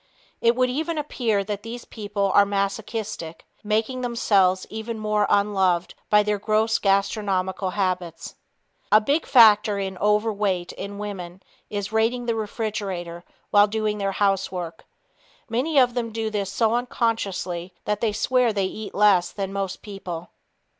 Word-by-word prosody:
It 235 +1 +4
would 255 0 +2
even 315 +4 -2
appear 235 -8 0
that 205 0 -4
these 235 +2 -8
people 205 -2 -2
are 200 - +7
masochistic, 200 -3 -3 0.2
making 220 +4 0
themselves 200 -6 +2
even 220 +1 -5
more 210 -1 +1
unloved 190 -4 +2 0.2
by 210 0 +5
their 210 0 -1
gross 220 +2 +1
gastronomical 195 -1 0
habits. 180 -4 -2 0.6
A 215 - +8
big 285 +9 0
factor 215 -4 +6
in 190 -2 -4
overweight 210 -3 +1
in 200 0 -7
women 190 -3 -7 0.3
is 205 -1 -4
"raiding 230 +2 +1
the 235 - +1
refrigerator" 200 -6 -4 0.3
while 205 0 +6
doing 215 0 -1
their 195 -1 -1
housework. 185 -4 -1 0.6
Most 265 +7 0
of 250 -2 +5
them 235 -2 -2
do 220 0 -3
this 200 -2 -2
so 225 +2 +1
unconsciously 200 -7 -1
that 210 0 -1
they 225 -2 +2
swear 240 +3 +2
they 200 -2 0
eat 210 +3 -6
less 200 -4 +4
than 195 -1 -4
most 195 -1 -4
people. 180 -5 -7
210 Hz, 145 wpm, -24 LUFS, 195-225 Hz, 0.6 s, A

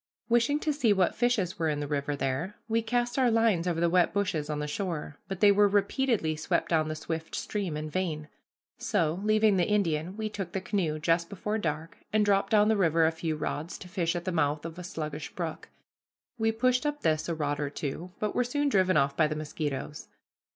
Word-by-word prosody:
Wishing 240 +5 +3
to 305 - 0
see 245 -8 +3
what 190 -3 +2
fishes 225 -8 0
were 160 -1 +1
in 150 -1 -1
the 145 - -2
river 145 0 -1
there, 140 +9 -2
we 230 0 +1
cast 240 +3 0
our 255 -2 +4
lines 225 -7 +2
over 170 -2 0
the 170 - +3
wet 175 0 +3
bushes 170 -7 -1
on 150 - -1
the 150 - -2
shore, 150 -2 -4
but 195 -2 -5
they 205 - +7
were 205 +1 +5
repeatedly 200 - +1
swept 160 - -1
down 155 -2 +2
the 155 - -3
swift 160 +1 -5
stream 190 -7 -3
in 155 0 -4
vain. 155 -2 -2 0.5
So, 170 -5 0
leaving 215 -1 +4
the 175 - +2
Indian, 180 -3 0
we 220 -1 -2
took 195 -5 -5
the 190 - 0
canoe, 185 -5 -1
just 165 +2 +1
before 210 +2 -2
dark, 160 -2 -4
and 215 -1 +3
dropped 200 -1 +2
down 210 -1 +5
the 220 - +3
river 165 -3 +3
a 160 - +3
few 160 -1 -3
rods 155 +2 -4
to 185 - -10
fish 175 -2 -1
at 175 - -4
the 185 - -1
mouth 150 -2 0
of 165 +1 -7
a - - -6
sluggish 155 -3 -5
brook. 165 -3 -5 0.7
We 225 0 +2
pushed 250 +2 +2
up 295 0 -2
this 155 0 +1
a 165 - -1
rod 145 -2 -1
or 145 -1 -1
two, 150 +5 -5
but 210 - -1
were 250 - +2
soon 290 +4 0
driven 185 - +3
off 140 -1 +2
by 155 0 +3
the 155 - -3
mosquitoes. 150 -1 -4
175 Hz, 220 wpm, -29 LUFS, 155-210 Hz, 0.7 s, they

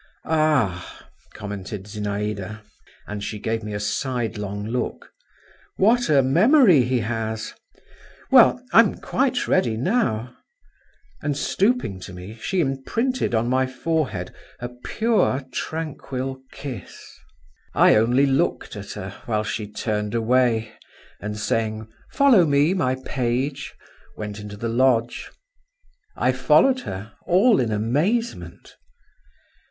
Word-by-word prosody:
"Ah!" 145 - 0 0.3
commented 100 -1 -6
Zinaïda, 105 0 -4 0.4
and 105 -1 -6
she 105 - -4
gave 110 +2 -2
me 105 - -5
a - - -2
sidelong 105 -3 -3
look, 125 +3 -4 0.7
"What 235 +5 +3
a 140 -3 +5
memory 185 - +5
he 125 0 0
has! 110 0 -3 0.8
Well? - - +6
I'm - - +6
quite - - -1
ready 110 -2 +2
now 125 - 0 0.4
…" - - -35
And 145 -2 -2
stooping 200 - 0
to 95 0 -9
me, 90 +4 -9
she 190 - 0
imprinted 160 - -1
on 115 +1 +1
my 130 +1 +2
forehead 130 - -2 0.3
a 120 - -5
pure, 140 - 0
tranquil 135 -4 -4
kiss. 135 -4 -8 0.8
I - - +6
only 120 +5 +4
looked 135 -1 0
at - - -7
her, - - -6 0.2
while 110 -2 0
she 110 0 -4
turned 105 0 -2
away, 115 -1 +2 0.5
and 105 0 -5
saying, 110 0 -2 0.2
"Follow 265 -10 +5
me, 145 +4 +3
my 130 -9 +1
page," 135 +2 -2 0.4
went 105 0 -6
into 105 0 -8
the 115 - -3
lodge. 120 0 +1 0.9
I - - +2
followed 265 -1 +4
her—all 175 - +1
in 115 -3 0
amazement. 120 - -2
120 Hz, 115 wpm, -23 LUFS, 105-145 Hz, 0.9 s, Well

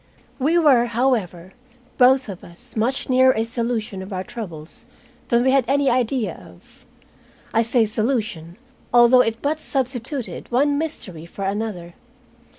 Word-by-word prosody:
We 305 +6 +2
were, 275 -8 +5
however, 215 -8 -1 0.5
both 260 0 +5
of 190 -3 -8
us 210 +9 -13
much 235 +5 0
nearer 260 0 +4
a 220 - +1
solution 230 -4 -3
of 190 +2 -9
our 185 -1 -3
troubles 175 -8 -9 0.4
than 235 0 +2
we 260 - +3
had 270 -1 +4
any 275 0 +2
idea 240 -5 0
of. 90 0 -17 0.7
I 225 - +3
say 230 0 +2
solution, 215 -6 -2 0.3
although 240 +1 +6
it 225 -1 -2
but 305 +2 0
substituted 260 -2 -3
one 285 +4 +2
mystery 185 - -5
for 195 +3 -6
another. 195 -4 -4
235 Hz, 145 wpm, -21 LUFS, 195-260 Hz, 0.7 s, although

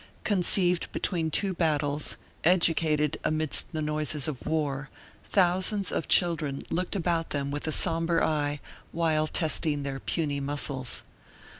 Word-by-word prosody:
Conceived 180 -3 +3
between 165 -4 -1
two 190 +5 0
battles, 150 -3 +1 0.3
educated 160 -3 +2
amidst 155 +1 0
the 155 -2 -3
noises 150 -1 -1
of 145 -5 -5
war, 145 -3 -1 0.4
thousands 190 +2 +1
of - - -2
children 160 -6 +1
looked 180 +4 -2
about 170 -3 0
them 140 -1 -2
with 145 +2 -4
a - - 0
somber 165 0 +2
eye 145 -2 0 0.3
while 160 -2 +1
testing 155 -2 0
their 135 -1 -4
puny 145 -3 -2
muscles. 140 -2 -2
155 Hz, 130 wpm, -28 LUFS, 145-170 Hz, 0.4 s, Conceived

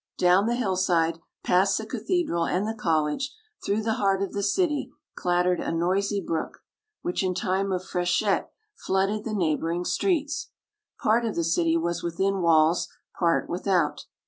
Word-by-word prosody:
Down 180 +4 +4
the 240 - +1
hillside, 180 -7 +1 0.2
past 190 +2 +3
the 220 - -4
cathedral 225 - -1
and 190 +4 0
the 220 - -1
college, 165 - 0 0.3
through 210 +2 0
the 220 0 +1
heart 195 -1 +2
of 195 - -4
the 200 - -2
city, 295 - 0 0.2
clattered 180 0 +1
a - - -2
noisy 190 +5 0
brook, 165 -4 -4 0.4
which 180 - -1
in 185 -1 0
time 190 +1 0
of 185 0 -2
freshet 180 +4 0 0.2
flooded 195 - -1
the 220 -2 -2
neighbouring 170 0 0
streets. 300 - 0 0.5
Part 225 +3 +3
of 225 -2 -2
the 170 - 0
city 165 0 +2
was 170 +1 -1
within 190 +3 -1
walls, 165 0 +4 0.3
part 170 -2 +2
without. 180 0 0
185 Hz, 155 wpm, -26 LUFS, 170-210 Hz, 0.5 s, Down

